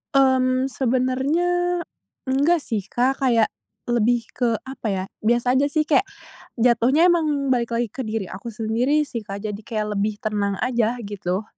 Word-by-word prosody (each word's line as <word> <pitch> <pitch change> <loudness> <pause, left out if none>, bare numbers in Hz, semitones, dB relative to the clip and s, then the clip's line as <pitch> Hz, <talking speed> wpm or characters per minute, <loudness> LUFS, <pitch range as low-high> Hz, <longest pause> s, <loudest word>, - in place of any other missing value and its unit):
Mmm, 260 -1 +3
sebenarnya 260 +5 0 0.8
enggak 280 +6 +3
sih, 220 -3 -1
Kak, 260 +3 0
kayak 235 -4 +4 0.4
lebih 240 0 +2
ke 235 -3 +1
apa 265 -4 -5
ya, 190 -2 -1 0.2
biasa 240 +3 +2
aja 280 - +3
sih, 305 +1 +1
kayak 310 +5 +3 0.6
jatuhnya 250 +8 +4
emang 305 -5 +1
balik 235 -2 0
lagi 235 0 0
ke 240 - -9
diri 220 -2 -2
aku 195 +5 -8
sendiri 235 +7 +1
sih, 235 - -4
Kak, 200 -1 -6
jadi 205 0 -5
kayak 210 -2 -3
lebih 205 +1 -1
tenang 205 -2 -1
aja, 240 -2 +1
gitu. 200 -1 -3
240 Hz, 155 wpm, -22 LUFS, 215-265 Hz, 0.8 s, kayak